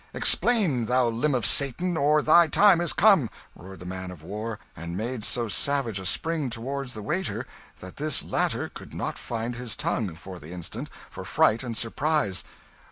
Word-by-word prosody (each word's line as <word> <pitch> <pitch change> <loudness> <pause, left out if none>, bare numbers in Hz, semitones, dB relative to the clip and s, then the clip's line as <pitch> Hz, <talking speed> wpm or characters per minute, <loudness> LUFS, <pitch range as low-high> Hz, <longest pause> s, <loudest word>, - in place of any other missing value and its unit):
"Explain, 185 - +5
thou 125 +1 +1
limb 130 +5 0
of 120 -5 -1
Satan, 170 +6 +5
or 150 0 +2
thy 170 +2 +5
time 190 +1 +4
is 175 - +1
come!" 195 - +4 0.3
roared 95 0 -12
the - - -9
man 95 0 -6
of 90 -4 -11
war, 105 +5 -6 0.2
and 85 +3 -7
made 115 +1 -4
so 120 +1 -1
savage 120 -1 -1
a 95 - -3
spring 160 - -2
toward 135 +4 -4
the 110 -4 -8
waiter 180 - -3 0.4
that 90 0 -11
this 150 -1 +2
latter - - -1
could - - -12
not - - -4
find 120 +1 -5
his 125 -3 -4
tongue, 100 -8 -2
for 90 +1 -11
the 75 - -13
instant, 90 -2 -7 0.2
for - - -8
fright 110 +2 +2
and 120 -3 -5
surprise. 115 - -1
120 Hz, 180 wpm, -25 LUFS, 100-150 Hz, 0.4 s, Explain